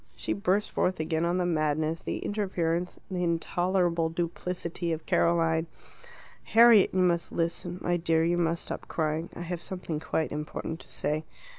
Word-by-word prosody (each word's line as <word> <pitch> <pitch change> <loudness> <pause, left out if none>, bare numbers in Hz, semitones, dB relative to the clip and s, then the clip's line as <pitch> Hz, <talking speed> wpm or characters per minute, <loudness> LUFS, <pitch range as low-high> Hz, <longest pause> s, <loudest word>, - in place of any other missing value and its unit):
She - - -2
burst 200 +1 0
forth 185 -1 0
again 160 +1 0
on 175 +1 +1
the 180 - +1
madness, 155 -1 0
the - - -3
interference, 180 -4 -1
the 180 -1 -1
intolerable 175 0 +1
duplicity 170 0 -3
of 160 -1 -3
Caroline. 165 -1 +2 0.7
"Harriet, 230 -3 +6
you 185 - +1
must 175 -2 +2
listen. 175 +1 -2
My 175 0 +1
dear, 165 -1 +2
you 175 +1 +2
must 170 0 0
stop - - -6
crying. 160 +1 -1
I - - -6
have 175 0 -4
something 180 -5 -4
quite 160 0 -1
important 150 +2 -4
to - - -15
say." 155 +1 -1
170 Hz, 160 wpm, -28 LUFS, 160-180 Hz, 0.7 s, Harriet